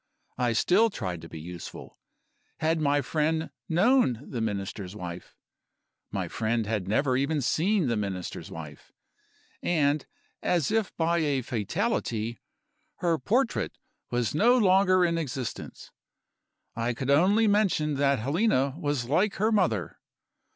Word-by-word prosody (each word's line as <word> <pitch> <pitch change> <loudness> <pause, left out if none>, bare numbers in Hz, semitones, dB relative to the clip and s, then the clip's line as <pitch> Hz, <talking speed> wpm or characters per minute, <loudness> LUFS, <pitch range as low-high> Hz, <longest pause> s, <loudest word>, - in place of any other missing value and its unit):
I 120 -2 +2
still 200 - +4
tried 90 - -5
to 80 - -10
be 80 - -8
useful. 85 +2 -9 0.6
Had 160 0 0
my 145 -1 +2
friend 160 +2 0 0.2
known 175 - +3
the 120 - -4
Minister's 100 -2 -4
wife? 90 -3 -8 0.7
My - - -3
friend 115 0 -1
had 105 -3 -2
never 130 +5 +2
even 140 +4 +1
seen 175 - +1
the 120 -3 +1
Minister's 95 -4 -4
wife. 75 -3 -10 0.7
And, 150 -3 +1 0.3
as 175 -3 +1
if 220 -2 +1
by 170 +1 +2
a 145 -5 0
fatality, 120 - -2 0.6
her 170 - 0
portrait 235 - 0 0.3
was 120 -2 -1
no 235 +11 +4
longer 185 -3 +4
in 170 -1 0
existence. 135 -5 -6 0.8
I 115 +1 -1
could 130 +3 -1
only 195 +10 +4
mention 195 -8 +2
that 140 0 +3
Helena 140 - +1
was 145 -6 -1
like 180 - +1
her 215 +3 +1
mother. 120 - 0
145 Hz, 130 wpm, -27 LUFS, 115-180 Hz, 0.8 s, still